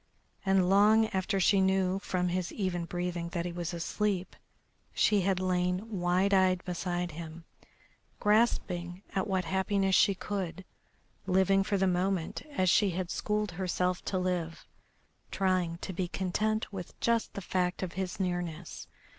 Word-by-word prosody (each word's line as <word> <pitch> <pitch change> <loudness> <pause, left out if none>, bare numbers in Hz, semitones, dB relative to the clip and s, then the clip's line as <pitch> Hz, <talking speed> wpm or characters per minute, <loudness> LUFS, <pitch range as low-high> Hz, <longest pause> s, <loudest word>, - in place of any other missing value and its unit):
And 190 -2 +3
long 210 +3 +5
after 195 +1 -1
she 195 +1 +4
knew 190 0 +2
from 180 -2 -1
his 180 0 -2
even 180 -4 -2
breathing 175 -1 -3
that 170 -1 -2
he 175 - -3
was 170 0 -4
asleep 190 +2 -2 0.6
she 210 -2 +3
had 190 0 +1
lain 185 +3 -1
wide 180 +3 +2
eyed 185 -1 +3
beside 175 -1 -2
him, 165 +1 -9 0.7
grasping 190 -4 +1
at 190 - 0
what 190 -2 0
happiness 190 +2 +1
she 195 +2 +5
could, 190 -2 -4 0.6
living 190 +1 +3
for 200 +1 0
the 190 - +2
moment 180 -1 0
as 185 -11 0
she 200 +3 +4
had 180 0 -3
schooled 210 -1 -1
herself 180 0 -1
to 190 - -1
live, 180 -3 -2 0.6
trying 185 -3 0
to 190 - -5
be 180 0 -2
content 210 +5 -1
with 180 -3 -8
just 230 -1 0
the - - -3
fact 180 0 -1
of 180 - -4
his 190 0 -4
nearness. 175 -2 -3
185 Hz, 150 wpm, -30 LUFS, 175-195 Hz, 0.7 s, long